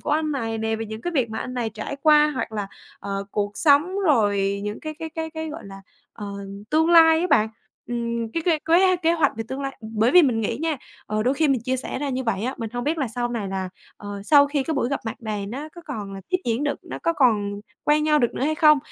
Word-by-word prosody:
của - - -4
anh 305 0 +1
này 225 -4 -2
nè, 220 0 -1
về 225 0 -5
những 220 +1 -7
cái 350 +5 -3
việc 250 -6 +1
mà 220 - -4
anh 250 - -5
này 235 -3 -2
trải 220 +6 -6
qua, 300 -1 +6
hoặc 255 - -3
là, 205 -2 -3 0.3
ờ, 200 0 -4
cuộc 205 0 -1
sống, 320 +6 +3
rồi 200 - +2
những 210 +1 -4
cái 310 0 -5
cái 325 -1 -5
cái 320 0 -4
cái, 320 0 -5
gọi 310 - -8
là, 195 0 -10 0.3
ờ, 210 - -8 0.4
tương 320 +2 +3
lai 325 -1 +7
á 360 - +1
bạn, 215 +1 +4 0.4
ừm, 235 -1 -2
cái 330 - -1
cái 325 -3 +3
kế 365 +3 +4
kế 335 -1 +2
hoạch 320 -4 +2
về 225 - -3
tương 265 +1 -4
lai 270 0 -4
Bởi 220 +1 +1
vì 360 -1 +8
mình 240 -6 +2
nghĩ 215 - -1
nha, 320 -2 0 0.3
ờ, 215 0 -1
đôi 255 +4 +2
khi 310 0 +2
mình 260 -4 +2
chia 260 +1 0
sẻ 260 - -4
ra 290 0 -2
như 260 -1 -2
vậy 210 -2 -1
á, 260 +2 -2
mình 225 -2 -4
hông 245 0 -3
biết 315 +2 0
là 270 -5 -1
sau 240 +1 -2
này 225 -5 -3
là, 190 -1 -3 0.3
ờ, 205 -1 -7
sau 285 +3 +6
khi 285 -1 -1
cái 320 +3 -2
buổi 255 -3 0
gặp 280 - -2
mặt 225 - -3
này 210 -2 -3
nó 275 +8 -6
có 345 - -10
còn 210 -9 -6
là 195 - -7
tiếp 365 +1 +1
diễn 235 +4 0
được, 290 - -1
nó - - -7
có 335 - +2
còn 205 -8 +2 0.2
quen 300 0 +3
nhau 305 -1 +4
được 240 -4 +1
nữa - - -3
hay 310 +2 +1
không. 305 -1 +6
255 Hz, 275 wpm, -23 LUFS, 220-310 Hz, 0.4 s, vì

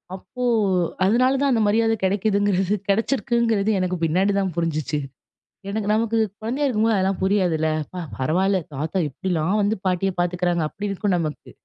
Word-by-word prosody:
அப்போ 250 +6 -8 0.6
அதனால 250 +6 +3
தான் 280 -1 +2
அந்த 225 - +2
மரியாதை 225 +1 +2
கிடைக்குதுங்கிறது, 200 0 +1
கிடைச்சிருக்குங்கிறது 225 -1 +1
எனக்கு 185 0 -1
பின்னாடிதான் 190 +3 +1
புரிஞ்சுச்சு. 155 -3 -1 0.7
எனக்கு 210 0 -2
நமக்கு 225 +1 0 0.2
குழந்தையா 255 +7 -2
இருக்கும்போது 225 -3 +2
அதெல்லாம் 190 0 0
புரியாதுல. 180 -5 +1 0.2
அப்பா! 180 +4 -8 0.2
பரவால்ல, 185 +8 +1 0.2
தாத்தா 155 +7 -2
எப்பிடிலாம் 185 +5 -1
வந்து 210 +2 +1
பாட்டிய 185 +1 +1
பாத்துக்கிறாங்க. 175 -1 0
அப்பிடி 205 +4 -5
இருக்கும் 195 -1 0
நமக்கு. 155 -2 -5
195 Hz, 135 wpm, -22 LUFS, 180-220 Hz, 0.7 s, அதனால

